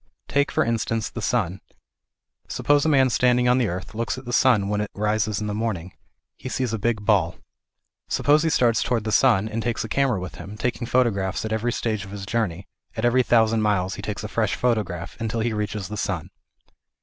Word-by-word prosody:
Take 140 0 +1
for - - +1
instance 115 -1 -1
the 120 - -6
sun. 95 -6 -1 0.9
Suppose 145 0 +2
a - - +3
man 135 -3 +4
standing 125 +1 +3
on 125 +1 +4
the 120 - +2
earth 90 +3 -5
looks 115 +3 -2
at 130 - -9
the 120 - -5
sun 120 -7 +4
when 105 0 0
it 105 - -3
rises 105 0 0
in 105 - -3
the 105 - -2
morning; 105 -6 -3 0.4
he 130 - -7
sees 125 -3 -2
a 115 - -1
big 110 -1 -1
ball. 95 -6 +2 0.7
Suppose 150 +1 +3
he 165 - +1
starts 120 -6 +3
towards 115 -2 0
the 110 - -1
sun 110 -3 +4
and 110 +1 -3
takes 120 0 -1
a - - -5
camera 130 -3 +1
with 90 -4 -7
him, 105 +2 -9
taking 120 +1 -2
photographs 100 -7 +1
at 110 - -2
every 115 +2 0
stage 110 -4 -2
of 95 - -10
his 100 0 -7
journey, 100 -4 -2 0.3
at 110 - 0
every 125 +2 +4
thousand 115 -2 +3
miles 100 -3 +1
he - - -7
takes 100 0 -5
a - - -3
fresh 110 -1 0
photograph, 105 -8 -1
until 115 0 -2
he 115 0 0
reaches 105 -2 -3
the 105 - -6
sun. 95 -5 -3
110 Hz, 215 wpm, -24 LUFS, 100-120 Hz, 0.9 s, man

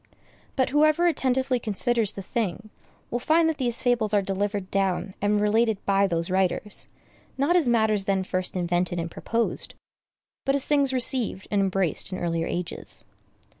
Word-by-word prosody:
But 260 -2 +1
whoever 310 +4 +4
attentively 260 -5 +1
considers 220 0 0
the 195 - -7
thing, 215 -1 -3 0.4
will 240 - -1
find 320 +6 +3
that 315 -2 -1
these 240 -2 0
fables 230 -4 +2
are 205 - +4
delivered 195 0 -2
down 195 0 0
and 205 +1 +2
related 220 +1 +2
by 200 0 +3
those 170 0 -1
writers, 190 +2 0 0.5
not 285 +6 +2
as 320 -8 +3
matters 220 -4 +2
then 195 -1 +1
first 185 0 -3
invented 175 0 0
and 165 0 -3
proposed, 230 0 -2 0.7
but 275 - +1
as 280 - 0
things 280 -2 +2
received 250 -6 -1
and 205 -1 +2
embraced 190 -2 0
in 185 - -3
earlier 165 -2 -1
ages. 175 -1 -5
210 Hz, 160 wpm, -25 LUFS, 190-250 Hz, 0.7 s, whoever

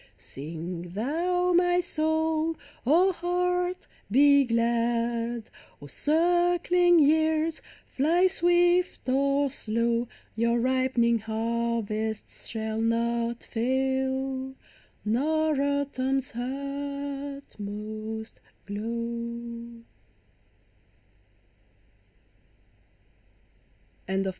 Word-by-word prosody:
Sing 170 +4 -7
thou, 350 - 0
my 355 0 +4
soul! 320 -1 0 0.3
O 350 +7 +5
heart, 360 +1 -1 0.2
be 280 +4 +6
glad! 235 0 0 0.3
O 145 - -11
circling 350 - +3
years, 315 +1 +3 0.2
fly 330 +7 +2
swift 350 -2 +2
or 275 +1 +2
slow! 230 0 0 0.3
Your 235 +1 +2
ripening 255 -2 +2
harvests 220 -1 -2
shall 220 0 -3
not 235 +1 0
fail, 265 +2 -1 0.5
Nor 300 +6 +1
autumn's 270 -2 0
utmost 270 -5 -5 0.3
crlow. 235 +2 -5
265 Hz, 60 wpm, -27 LUFS, 230-315 Hz, 0.5 s, be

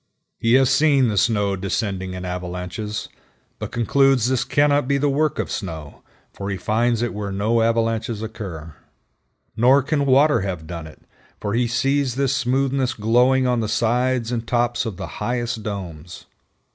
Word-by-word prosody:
He 115 +1 +2
has 130 0 +5
seen 140 -5 +4
the 105 - -1
snow 100 -2 +2
descending 95 -1 -3
in 90 0 -6
avalanches, 90 +4 -5 0.5
but - - -5
concludes 130 +1 +3
this 130 0 +1
cannot 145 -2 +2
be 140 0 +2
the 145 0 +1
work 150 +2 +1
of - - -3
snow, 80 -6 -6 0.3
for 100 0 -5
he 95 - -2
finds 115 +4 +1
it 120 - -2
where 105 -1 -4
no 110 +4 +1
avalanches 115 -1 0
occur. 90 -8 -7 0.8
Nor 130 +4 +4
can 145 0 0
water 140 +1 +4
have 90 -5 -4
done 85 -2 -7
it, 80 - -16 0.4
for 100 - -3
he 120 +1 +1
sees 135 +1 0
this 135 0 +1
smoothness 130 0 0
glowing 125 +4 +3
on 125 -1 +1
the 110 - -1
sides 120 +2 +1
and 115 -1 -3
tops 120 0 0
of 100 -5 -5
the - - -5 0.2
highest 120 -2 -2
domes. 90 -6 -7
115 Hz, 165 wpm, -22 LUFS, 100-130 Hz, 0.8 s, has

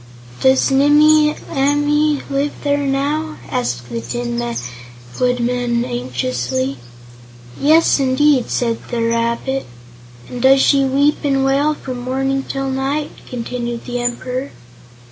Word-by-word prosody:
"Does 265 +1 +3
Nimmie 300 +2 +5 0.2
Amee 290 +1 +1
live 280 +1 0
there 285 0 +1
now?" 295 +3 -1
asked 120 0 -2
the 115 -1 -4
Tin 120 0 -3 0.8
Woodman 245 -1 0
anxiously. 125 - -2 0.8
"Yes, 315 +2 +4
indeed," 270 0 +2
said 230 -2 -1
the 235 -2 -1
rabbit. 235 +3 -1 0.6
"And 245 - -7
does 270 +1 +6
she 275 0 +4
weep 280 +3 +2
and 275 -2 +1
wail 285 +3 +2
from 255 -3 -6
morning 270 +2 -1
till 270 0 -2
night?" 275 +3 -2 0.2
continued 240 -1 -4
the 245 -1 -3
Emperor. 250 +2 -3
265 Hz, 115 wpm, -18 LUFS, 235-285 Hz, 0.8 s, does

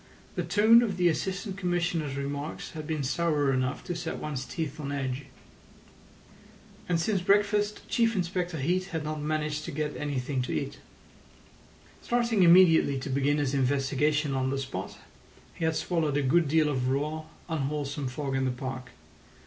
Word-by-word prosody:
The - - -1
tone 220 +3 +6
of 205 -6 -1
the 175 -1 +4
Assistant 190 +4 -3
Commissioner's 175 -6 -1
remarks 140 +2 -4
had 155 -2 -7
been 155 -3 -1
sour 145 -1 +1
enough 130 0 -1
to 175 - -4
set 160 -1 -4
one's 140 -4 -4
teeth 155 -1 -4
on 140 -2 -4
edge. 135 -1 -3 1.6
And 170 -2 +2
since 195 +2 0
breakfast 205 +2 +2
Chief 230 -1 +2
Inspector 180 -2 -1
Heat 180 +7 0
had 165 -5 -4
not 155 0 -3
managed 150 0 -1
to - - -5
get 150 +1 -3
anything 140 -2 -2
to 125 - -3
eat. 140 0 -3 1.2
Starting 235 -4 +1
immediately 170 -5 +6
to 135 +1 -4
begin 140 +2 +2
his 145 -2 0
investigation 140 +2 +1
on 130 0 0
the 135 - -1
spot, 135 -1 -5 0.6
he 165 - -3
had 160 0 +1
swallowed 155 -5 0
a 145 - +1
good 165 +4 +3
deal 155 +1 +3
of 130 -4 0
raw, 150 +4 -1 0.2
unwholesome 145 -3 -2
fog 135 +1 -3
in 135 0 +1
the - - +1
park. 130 0 -5
150 Hz, 165 wpm, -28 LUFS, 140-175 Hz, 1.6 s, tone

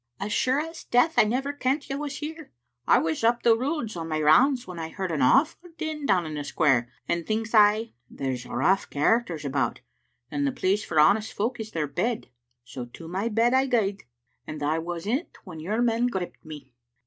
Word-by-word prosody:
" - - -46
As 205 +1 -3
sure 260 +2 +2
as 325 +2 -6
death 245 +7 +3
I - - +7
never 265 +6 -1
kent 275 +1 -1
you 275 +1 -3
was 285 -2 -4
here. 315 0 -7 0.4
I - - +6
was 160 +5 -1
up 235 +1 +2
the 230 -1 +6
Roods 255 - -2
on 165 -1 -5
my 155 -1 -1
rounds 245 - +4
when 180 -2 -8
I 160 0 -4
heard 190 0 -4
an 155 - -1
awfu' 320 - +2
din 310 -2 -4
down 180 -4 +3
in 155 - -5
the 145 -1 -4
square, 135 -5 +2 0.2
and 170 0 -1
thinks 220 +1 -2
I, 215 +1 +4 0.2
there's 130 -2 -4
rough 185 +10 +1
char 225 +12 +2
acters 165 -8 -7
about, 135 -3 -1 0.5
and 145 -1 0
the - - +1
place 195 +7 0
for 155 - 0
honest 205 +8 +4
folk 230 +4 -2
is 220 -1 -5
their 160 -7 -2
bed. 220 - -2 0.4
So 125 -1 -7
to 160 +7 -12
my 190 +7 -2
bed 230 +3 +2
I 265 +1 +3
gaed, 205 -6 0 0.4
and 155 -1 -6
I 155 +2 +1
was 170 +1 -5
in't 260 - -2
when 170 -4 -9
your 210 +9 -1
men 235 +1 +2
gripped 190 -7 -5
me." 150 -5 -11
205 Hz, 215 wpm, -26 LUFS, 155-245 Hz, 0.5 s, I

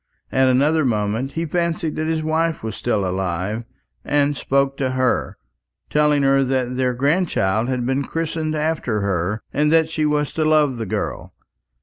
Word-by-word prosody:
At 130 0 +3
another 145 +5 +3
moment 115 +2 -1
he 165 +1 -2
fancied 165 -1 -1
that 155 0 -1
his 160 -1 -1
wife 160 -1 0
was 110 - -4
still 105 -5 -1
alive, 95 +4 -2 0.4
and 145 0 +1
spoke 140 +1 +1
to 130 -2 -1
her, 130 -1 0 0.5
telling 150 -1 +3
her 135 0 +4
that 130 -1 -1
their 125 -1 0
grandchild 130 - +1
had 125 -2 -1
been 135 +2 0
christened 160 -1 -2
after 150 -8 -1
her, 100 +2 -1
and 150 +2 +2
that 160 -1 +4
she 155 -1 0
was 150 -1 0
to 160 - -1
love 155 -4 +3
the 115 -2 -4
girl. - - -4
135 Hz, 165 wpm, -21 LUFS, 120-155 Hz, 0.5 s, her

